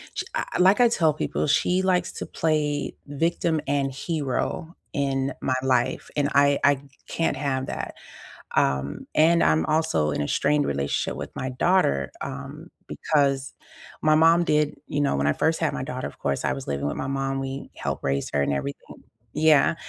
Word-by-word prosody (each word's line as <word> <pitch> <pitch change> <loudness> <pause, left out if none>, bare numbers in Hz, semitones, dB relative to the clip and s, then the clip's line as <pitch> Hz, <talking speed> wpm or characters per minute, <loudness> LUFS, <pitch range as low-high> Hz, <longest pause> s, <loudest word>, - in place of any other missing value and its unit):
sh - - -2
I - - -1
like 190 +5 +5
I 245 - +7
tell 160 -9 +2
people, 155 - -2
she 180 +5 +2
likes 180 -2 +1
to - - -5
play 150 -2 -1
victim 160 +2 0
and 140 -1 0
hero 150 +3 -3 0.2
in 135 -1 0
my 130 - 0
life, 130 -2 0
and 145 -1 +1
I 140 0 +4
I 140 -1 +4 0.3
can't 165 -4 -1
have 135 -2 -1
that. - - -5 0.6
Um, 70 +1 0
and 165 +2 +4
I'm 80 0 +3
also 155 - +1
in 75 - -2
a 75 - -1
strained 145 +1 +2
relationship 70 0 -1
with - - -7
my 130 - -3
daughter, 125 - +1
um, 140 +4 -7 0.2
because 140 -3 0 0.5
my 155 0 +4
mom 165 +2 +5
did 150 0 +1
you 145 - -1
know, 140 - +1
when 70 +1 +1
I 75 - +3
first 160 0 +1
had 160 -3 0
my - - -3
daughter, 130 -1 -4
of - - -12
course, 70 -1 -1
I 65 - +1
was 65 0 -7
living 70 0 -2
with 75 - -2
my 130 - -3
mom, 135 0 -1
we 135 0 -5
helped - - -4
raise 70 0 -1
her 70 - +2
and 70 - +1
everything. 70 +1 -6 0.3
Yeah. 155 +1 +5
140 Hz, 185 wpm, -25 LUFS, 130-155 Hz, 0.6 s, I